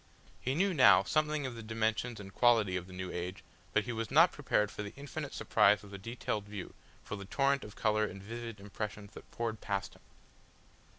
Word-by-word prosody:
He 130 +2 -1
knew 190 +3 +2
now 130 -5 +7
something 155 -1 +1
of 130 - -3
the 115 - -7
dimensions 110 +1 -1
and 100 -1 -9
quality 115 -6 +4
of 90 -1 -3
the - - -12
new 95 0 -5
age, 90 +2 -5 0.3
but 105 - +2
he 120 - -4
was 115 0 -3
not 165 +6 +6
prepared 105 -7 +1
for - - -6
the 100 -1 -7
infinite 140 -1 -6
surprise 105 +1 +3
of 100 - -12
the 100 - -7
detailed 110 -1 -3
view, 105 -2 -7 0.3
for - - -5
the 100 -1 -7
torrent 140 +6 +1
of 105 - -10
colour 110 0 +2
and 100 - -7
vivid 115 0 -6
impressions 105 0 -6
that - - -12
poured 115 -2 -3
past 100 -1 -2
him. - - -19
110 Hz, 210 wpm, -33 LUFS, 100-125 Hz, 0.3 s, now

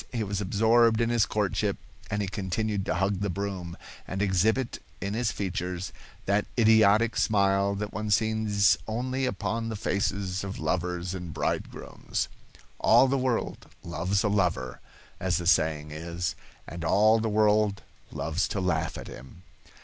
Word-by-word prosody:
He 115 -3 -1
was 100 0 -3
absorbed 110 +3 +3
in 115 0 +1
his 115 -3 +3
courtship, 105 -1 0 0.3
and 105 -1 -1
he - - -2
continued 100 +1 -2
to - - 0
hug 95 0 0
the 100 0 -1
broom, 95 -3 -4 0.3
and 95 - -4
exhibit 105 +6 +1 0.2
in 100 0 -3
his 115 0 0
features 90 -2 -4 0.3
that 100 +1 +1
idiotic 110 0 +5
smile 100 -2 +2
that 105 +1 -4
one 105 0 -3
sees 105 -4 +3
only 130 +4 -1
upon 115 +2 -2
the 110 - -3
faces 95 -1 -1
of 100 0 -5
lovers 90 0 -2
and 90 -3 -6
bridegrooms. - - -3 0.5
"All 135 - +6
the 135 - +1
world 130 -3 -1 0.2
loves 85 +4 -1
a - - +2
lover," 90 -11 0 0.4
as 95 0 +1
the 90 - -4
saying 80 -3 +2
is, 85 +2 -3 0.3
and 85 0 -7
all 110 +5 +4
the 110 0 -1
world 105 -1 +2 0.3
loves 80 +5 -1
to 100 - -3
laugh 85 -4 -1
at - - -8
him. 70 +8 -12
100 Hz, 155 wpm, -27 LUFS, 90-110 Hz, 0.5 s, All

